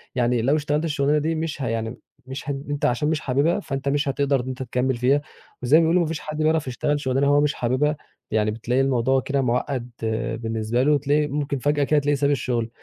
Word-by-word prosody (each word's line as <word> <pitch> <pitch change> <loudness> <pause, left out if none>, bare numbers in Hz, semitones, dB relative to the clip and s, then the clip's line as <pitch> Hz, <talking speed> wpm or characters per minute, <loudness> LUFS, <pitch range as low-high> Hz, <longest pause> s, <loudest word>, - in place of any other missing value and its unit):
يعني 120 -1 +2
لو 140 +6 +2
اشتغلت 150 +1 0
الشُغلانة 145 -1 +1
دي 160 +2 0
مش 155 -2 -3
ه 130 - -1
يعني 115 +1 -3 0.3
مش 135 +2 -7
هن 140 0 -3
أنت 145 -1 -1
عشان 125 +5 +1
مش 160 -1 0
حابِبها، 140 +8 +1
فأنت 140 -5 -3
مش 145 0 0
هتقدر 140 -1 +1
إن 125 - -8
أنت 130 0 -4
تكمِّل 125 +1 0
فيها، 135 +4 +2 0.4
وزي 140 +6 +5
ما - - +5
بيقولوا 170 +2 +3
ما 165 - 0
فيش 160 -2 -3
حد 155 0 -6
بيعرف 155 -2 +1
يشتغل 145 +4 -1
شُغلانة 135 0 +1
هو 145 0 +4
مش 150 0 +1
حابِبها، 130 +5 0 0.4
يعني 110 -1 +1
بتلاقي 120 +4 0
الموضوع 130 0 +2
كده 140 -1 -1
مُعقَّد 125 0 -1 0.5
بالنسبة 115 +2 -1
له، 150 0 +4
تلاقي 145 +2 +1
ممكن 140 0 -2
فجأة 145 +1 +1
كده 150 +1 +3
تلاقيه 145 0 +1
ساب 140 +1 +1
الشُغل. 120 -4 -1
140 Hz, 220 wpm, -23 LUFS, 125-150 Hz, 0.5 s, وزي